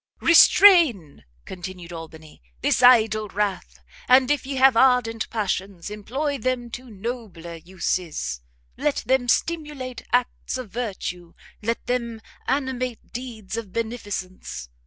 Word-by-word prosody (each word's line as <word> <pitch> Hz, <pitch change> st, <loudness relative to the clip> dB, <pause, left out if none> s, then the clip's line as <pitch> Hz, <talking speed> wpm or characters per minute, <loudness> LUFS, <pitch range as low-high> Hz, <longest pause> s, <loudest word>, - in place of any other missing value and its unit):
"Restrain," 330 Hz, -, +6 dB, 0.2 s
continued 180 Hz, -1 st, -8 dB
Albany, 160 Hz, -, -11 dB, 0.2 s
"this -, -, +2 dB
idle 220 Hz, -4 st, +5 dB
wrath; 195 Hz, -, -3 dB, 0.3 s
and 255 Hz, +1 st, +5 dB
if 290 Hz, -2 st, -1 dB
ye 275 Hz, -, -3 dB
have 265 Hz, -1 st, +5 dB
ardent 235 Hz, -2 st, +3 dB
passions, 195 Hz, -3 st, -3 dB
employ 270 Hz, +8 st, -3 dB
them 245 Hz, 0 st, -2 dB
to 250 Hz, +1 st, -8 dB
nobler 200 Hz, -6 st, -7 dB
uses; 170 Hz, -, -3 dB, 0.4 s
let 295 Hz, -, 0 dB
them 260 Hz, -2 st, +1 dB
stimulate 295 Hz, -3 st, -1 dB
acts 250 Hz, +1 st, 0 dB
of 250 Hz, -6 st, -8 dB
virtue, 185 Hz, -7 st, -5 dB, 0.3 s
let 230 Hz, +2 st, -2 dB
them 235 Hz, -2 st, -2 dB, 0.3 s
animate 255 Hz, -3 st, -2 dB
deeds 225 Hz, -5 st, -6 dB
of 220 Hz, -5 st, -6 dB
beneficence! 200 Hz, -, -5 dB
230 Hz, 115 wpm, -23 LUFS, 190-255 Hz, 0.4 s, Restrain